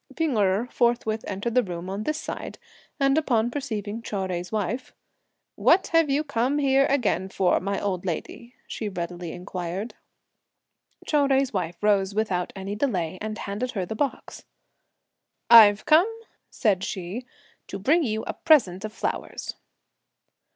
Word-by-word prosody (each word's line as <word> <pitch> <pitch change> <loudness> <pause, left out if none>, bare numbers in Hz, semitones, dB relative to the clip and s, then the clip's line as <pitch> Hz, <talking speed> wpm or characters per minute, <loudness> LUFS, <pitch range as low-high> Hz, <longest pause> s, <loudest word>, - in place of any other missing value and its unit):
P'ing 320 -6 0
Erh 200 +1 +2
forthwith 235 -2 +1
entered 205 +4 -3
the 250 - +5
room 175 -4 -6
on 195 +2 -4
this 305 0 -1
side, - - -6 0.4
and 275 +2 +3
upon 240 -6 +1
perceiving 225 -6 -4
Chou 220 - -6
Jui's 180 -2 -3
wife: 220 +4 -3 0.6
"What 370 +3 +4
have 330 -2 +3
you 285 +2 +1
come 275 0 0
here 275 -1 +3
again 235 -8 0
for, 185 -2 +2
my 200 +2 -2
old 185 -3 -2
lady?" 235 +7 -5
she 215 - -4
readily 175 -2 -5
inquired. 180 +4 -5 1.1
Chou 290 -2 +2
Jui's 270 -2 +2
wife 175 -3 -2
rose 200 -2 +2
without 190 -5 -1
any 195 +1 -5
delay, 185 - -1
and 215 0 -4
handed 210 +6 -4
her 190 -4 -2
the 200 - -5
box. 275 +4 -3 1.1
"I've 215 -3 +8
come," 325 +7 +5 0.4
said 195 -6 +1
she, 195 +8 -5 0.4
"to 195 - -5
bring 290 - +3
you 220 -6 -1
a - - -3
present 215 - +3
of 215 - -4
flowers." - - -4
215 Hz, 150 wpm, -25 LUFS, 190-265 Hz, 1.1 s, I've